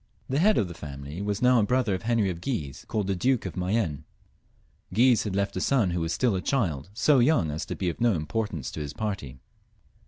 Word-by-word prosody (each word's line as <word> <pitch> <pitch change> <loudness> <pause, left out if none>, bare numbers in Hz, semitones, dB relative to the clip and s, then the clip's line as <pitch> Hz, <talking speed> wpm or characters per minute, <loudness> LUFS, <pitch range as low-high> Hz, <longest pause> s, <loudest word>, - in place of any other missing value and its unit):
The 135 +2 0
head 210 +5 +4
of 100 - +2
the 85 - -7
family 75 +1 -7
was 105 +2 -2
now 125 -1 +5
a - - +3
brother 125 -1 +1
of 95 - -2
Henry 110 -4 +1
of 85 -1 -7
Guise, 75 - -4
called 105 -2 -1
the 95 0 0
Duke 125 +5 +1
of 95 - -5
Mayenne; 90 -5 -1 0.9
Guise 120 +4 +4
had 100 -3 -2
left 100 0 -1
a 95 - -2
son 115 -8 +2
who 85 0 -1
was 80 0 -1
still 120 +2 +1
a 95 - -1
child, 90 - -1
so 135 +4 +4
young 120 - +3
as 75 - -4
to - - -4
be 95 - -2
of 85 - -3
no 120 -4 +4
importance 85 - -3
to - - -6
his 75 -1 -5
party. 95 -12 -4
100 Hz, 230 wpm, -27 LUFS, 85-120 Hz, 0.9 s, now